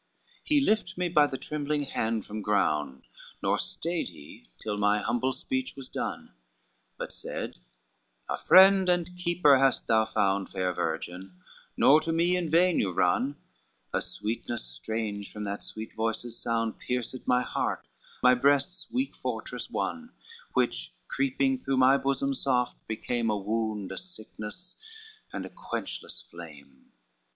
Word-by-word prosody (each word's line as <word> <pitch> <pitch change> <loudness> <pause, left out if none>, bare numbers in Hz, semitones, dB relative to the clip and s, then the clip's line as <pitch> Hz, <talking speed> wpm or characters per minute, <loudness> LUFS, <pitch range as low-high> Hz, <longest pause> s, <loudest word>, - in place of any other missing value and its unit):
XCIV - - -35
"He 295 -2 +4
lift 210 -7 +1
me 180 -1 0
by 150 -3 +5
the 135 - -4
trembling 150 0 -2
hand 115 -5 -1
from 105 +1 -5
ground, 75 -10 +1 0.4
Nor - - +2
stayed 170 - -2
he 75 -4 -13
till 105 - -3
my 105 0 +3
humble 120 +4 0
speech 260 - -3
was 135 -2 -9
done; - - -4 0.7
But - - -5
said, - - -5 0.7
'A - - -2
friend 190 0 +7
and 175 0 +1
keeper 175 -6 +4
hast 135 -1 +3
thou 110 -1 +4
found, 100 -3 +1
Fair 90 -1 -1
virgin, 90 +3 -4 0.4
nor 150 +3 +7
to 165 - -1
me 170 +2 +3
in 175 -3 -1
vain 175 +3 +4
you 95 - +1
run:' 105 +11 +2 0.6
A - - +1
sweetness 115 - -3
strange 100 - -4
from 105 - -6
that 100 0 -4
sweet 110 +1 -6
voice's 115 +1 -2
sound 115 -1 -1
Pierced 125 0 -3
my 125 0 +4
heart, - - -2 0.4
my 125 0 +8
breast's 140 +8 +2
weak 260 +2 -1
fortress - - -4
won, 245 -1 -3 0.4
Which - - 0
creeping 270 -1 +1
through 135 - -1
my 130 +1 +6
bosom 140 0 0
soft 125 -2 +1
became 115 +1 -1
A 105 - +1
wound, 105 -1 -2
a 95 - -4
sickness, 180 +1 -7 0.5
and - - -4
a - - -7
quenchless - - -5
flame. 75 -6 -13
125 Hz, 150 wpm, -28 LUFS, 105-170 Hz, 0.7 s, my